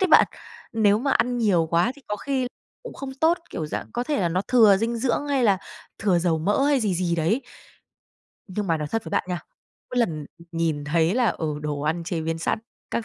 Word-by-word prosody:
đấy 380 - +3
bạn. - - +7 0.5
Nếu 210 -2 +4
mà 275 +3 0
ăn 245 0 +2
nhiều 190 -8 +3
quá 175 +9 +3
thì 285 - -17
có 210 - -1
khi 265 +2 -1 0.4
cũng 485 - -8
không 265 -1 -6
tốt, 325 +5 +3
kiểu, 155 - -3
dạng - - -5
có 245 - -1
thể 295 -2 0
là 175 - +2
nó 180 +3 0
thừa 220 -6 +6
dinh 230 +3 -1
dưỡng 260 +4 0
hay 270 -4 +2
là 195 -3 +4 0.4
thừa 195 -4 +2
dầu 170 -2 +1
mỡ 205 - +2
hay 285 -3 +3
gì 205 -5 +1
gì 175 -1 0
đấy. 180 - +1 1.1
Nhưng 200 +2 -3
mà 165 -3 +2
nói 150 -1 -4
thật 225 +4 -2
với 160 - -7
bạn - - +1
nha, 180 -2 -2 0.5
mỗi 250 - -1
lần, 155 -11 0
ừ, 170 - -14
nhìn 165 -3 -1
thấy 165 +4 +2
là, 245 -1 +3
ừ, 155 -2 -2
đồ 150 -1 -2
ăn 160 +3 -1
chế 170 -2 -2
biến 165 +1 -2
sẵn 165 - 0 0.3
các 230 - -1
200 Hz, 235 wpm, -24 LUFS, 165-245 Hz, 1.1 s, bạn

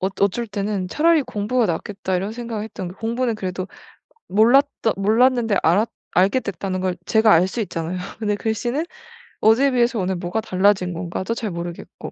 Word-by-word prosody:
어 185 - 0
어쩔 200 +4 +1
때는 200 -2 -2
'차라리 320 - +3
공부가 220 +3 0
낫겠다.' 190 +2 -3
이런 190 +3 -1
생각을 230 -2 -5
했던 215 -4 -6
게 180 - -10
공부는 230 +3 -1
그래도 185 -3 -4 0.6
몰랐던 230 +2 +3
몰랐는데 225 +1 +3
알았 200 +8 +3 0.2
알게 195 +8 +3
됐다는 190 -3 -4
걸 185 -1 0
제가 220 -1 +4
알 170 +3 +5
수 230 +4 -2
있잖아요. 170 -2 -4 0.2
근데 210 -2 -1
글씨는 240 +8 -1 0.6
어제에 245 +6 +4
비해서 240 -2 +2
오늘 190 0 -1
뭐가 175 +5 -2
달라진 190 -3 +2
건가도 180 +5 -3
잘 230 -2 -3
모르겠고. 170 0 -7
210 Hz, 380 characters per minute, -21 LUFS, 185-230 Hz, 0.6 s, 알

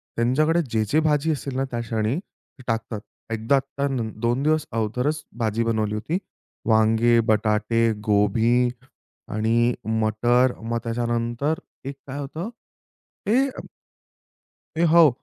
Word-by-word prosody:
त्यांच्याकडे 155 +8 +2
जे-जे 110 +7 +2
भाजी 150 +1 +2
असेल 140 -3 -4
ना, 135 - +1
त्या 120 - -2
क्षणी 115 +1 -1
ते 135 -7 -20
टाकतात. 115 -2 -2 0.3
एकदा 115 +5 +2 0.2
तर 140 0 +1 0.3
2 120 +3 +1
दिवस 155 0 +2
अगोदरच 125 +7 -1
भाजी 115 0 0
बनवली 110 -2 0
होती. 155 +11 -1 0.5
वांगे, 115 +2 +4
बटाटे, 110 +1 +2
गोभी 110 +4 +3 0.6
आणि 115 +3 +2 0.3
मटर 120 +4 +3
मग 115 +1 -2
त्याच्यानंतर 120 +5 -1 0.3
एक 140 - -5
काय 135 +2 -6
होतं 155 +7 -5 0.8
हे 255 +6 +4
अ, 265 - -8 1.2
ए 165 - +3
हो. 165 -1 +7
120 Hz, 120 wpm, -24 LUFS, 110-140 Hz, 1.2 s, हो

